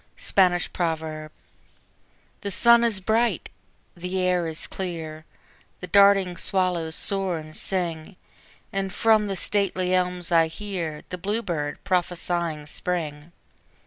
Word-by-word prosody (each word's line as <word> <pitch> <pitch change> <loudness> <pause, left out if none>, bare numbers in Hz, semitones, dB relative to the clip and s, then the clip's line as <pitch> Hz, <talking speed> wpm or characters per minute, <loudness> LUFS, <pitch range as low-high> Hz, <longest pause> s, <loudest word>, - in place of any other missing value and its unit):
Spanish 180 -2 +2
Proverb 160 -2 -3 1.1
The 200 - -3
sun 235 +4 +5
is 225 -4 +1
bright, 225 +5 +1 0.5
the 180 +2 -3
air 180 -2 +1
is 160 -1 -4
clear, 160 -4 -6 0.5
The - - -6
darting 195 -1 +5
swallows 180 -5 +1
soar 195 -3 0
and 155 0 -9
sing. 175 -2 -3 0.6
And 195 -1 -1
from 215 0 +3
the 195 - -2
stately 185 -1 0
elms 180 -1 0
I 165 -1 +5
hear 165 -3 -5
The 180 - -5
bluebird 175 -7 -2
prophesying 175 -3 -1
Spring. 155 -1 -4
180 Hz, 115 wpm, -25 LUFS, 160-195 Hz, 1.1 s, sun